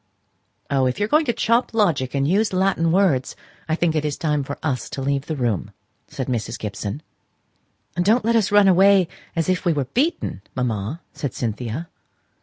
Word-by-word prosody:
"Oh, 135 -2 +3
if 125 - -2
you 205 - +2
are - - -4
going 305 +7 +3
to 240 - +2
chop 235 0 +1
logic 155 - +1
and 140 0 +1
use 205 +5 +2
Latin 185 -3 +2
words, 170 -9 +2 0.3
I 160 - +2
think 170 -1 +1
it 155 - +1
is 150 -2 -2
time 150 -3 0
for 140 +1 -6
us 135 -5 -2
to - - -6
leave 140 +1 -1
the 155 - -2
room," 120 - -1 0.4
said 130 - -4
Mrs. 120 -4 -3
Gibson. 105 +6 -5 0.9
"Don't 210 +6 +2
let 230 +1 +2
us 215 -4 +2
run 205 -1 +6
away 190 0 +5 0.3
as 165 -1 0
if 185 -1 0
we 175 - +2
were 145 -3 -1
beaten, 290 - -1
mamma," 125 - -2
said 140 -3 -4
Cynthia. 120 +6 -3
155 Hz, 190 wpm, -22 LUFS, 130-195 Hz, 0.9 s, run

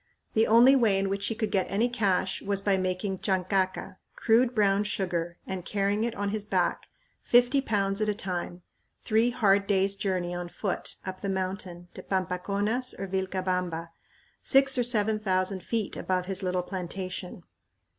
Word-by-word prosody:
The 220 +1 +3
only 240 +5 +7
way 225 -7 +3
in 195 0 0
which 200 0 -1
he 225 - -2
could 215 -1 -2
get 190 -3 0
any 210 +5 +2
cash 200 -6 0
was 200 -1 -1
by 200 0 +2
making 185 +1 -2
chancaca, 185 -1 -1 0.2
crude 235 +2 +3
brown 200 -1 +3
sugar, 175 -5 -2
and 190 -2 -5
carrying 205 +3 0
it 235 -1 -2
on 200 0 -2
his 210 0 -3
back, - - 0 0.3
fifty 245 +3 +4
pounds 200 -4 0
at 215 - +1
a 210 - 0
time, 180 -3 -4 0.4
three 225 +1 +3
hard 200 -4 +2
days' 195 -1 +2
journey 185 -3 -2
on 175 0 -5
foot 195 +1 -3
up 185 0 -6
the 200 - -2
mountain 185 -2 -4
to - - -8
Pampaconas 200 +6 -1
or 195 - -4
Vilcabamba, 185 -3 -2 0.5
six 270 -1 +4
or 245 - +2
seven 220 -3 +1
thousand 185 -2 0
feet 220 +1 -2
above 185 -1 -1
his 190 0 -1
little 180 -1 -1
plantation. 185 -1 -6
195 Hz, 165 wpm, -28 LUFS, 185-215 Hz, 0.5 s, only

